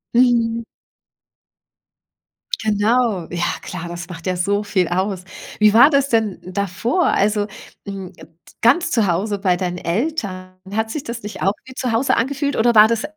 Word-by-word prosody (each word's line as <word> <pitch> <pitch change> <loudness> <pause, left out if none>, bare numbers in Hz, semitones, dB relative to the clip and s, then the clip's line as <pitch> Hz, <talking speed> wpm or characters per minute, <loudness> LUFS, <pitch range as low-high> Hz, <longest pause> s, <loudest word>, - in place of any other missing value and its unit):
Mhm. 235 -2 +3 2.0
Genau. 215 -3 +1
Ja, 175 0 -2 0.2
klar, 175 -2 -6
das 175 0 -7
macht 170 +1 -8
ja 185 - 0
so 200 +3 0
viel 185 -3 0
aus. 185 +1 -1 0.4
Wie 210 0 +5
war 245 +6 +8
das 280 -1 +2
denn 220 -4 +1
davor? 200 - -1
Also, 205 +1 +1 0.4
hm, 195 -2 -7
et - - -14 0.3
ganz 275 +10 +3
zu 220 -4 +2
Hause 200 +4 -1
bei 185 -3 +2
deinen 180 -1 -3
Eltern, 185 - -3 0.2
hat 220 +1 -1
sich 295 +1 -4
das 235 0 -6
nicht 210 - -7
auch 195 +2 +2
wie 260 - -11
zu 255 -2 -2
Hause 230 +5 +2
angefühlt 280 +3 -1
oder 235 +1 +3
war 215 +1 +9
das 230 +1 -1
210 Hz, 165 wpm, -20 LUFS, 185-235 Hz, 2.0 s, war